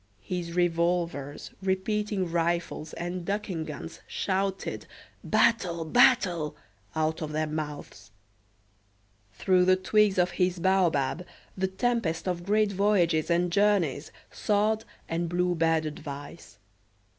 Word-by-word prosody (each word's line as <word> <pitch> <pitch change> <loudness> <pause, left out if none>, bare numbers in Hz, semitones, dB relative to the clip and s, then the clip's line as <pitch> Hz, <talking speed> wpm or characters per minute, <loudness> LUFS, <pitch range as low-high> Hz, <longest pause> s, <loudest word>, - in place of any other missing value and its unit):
His 175 -2 -4
revolvers, 170 -4 0
repeating 195 0 -1
rifles, 170 -2 -1
and 175 +1 -4
ducking 195 -4 -3
guns 155 +2 -8
shouted 195 0 -2 0.4
"Battle! 170 -7 +2
battle!" 175 -6 +3 0.4
out 160 +1 0
of 155 -1 -4
their 155 +1 0
mouths. 150 -5 -6 1.3
Through 185 -2 +3
the 185 0 +5
twigs 205 +1 +2
of 180 0 +3
his 180 0 0
baobab, 175 -4 +1 0.3
the 190 0 0
tempest 190 -4 -1
of 175 -1 -2
great 210 +2 +2
voyages 185 -6 +2
and 175 +1 +2
journeys 190 -7 +2 0.2
soughed 215 +1 +1 0.2
and 165 +1 -2
blew 180 +1 +1
bad 165 -1 +2
advice. 150 -3 -8
175 Hz, 110 wpm, -28 LUFS, 165-195 Hz, 1.3 s, the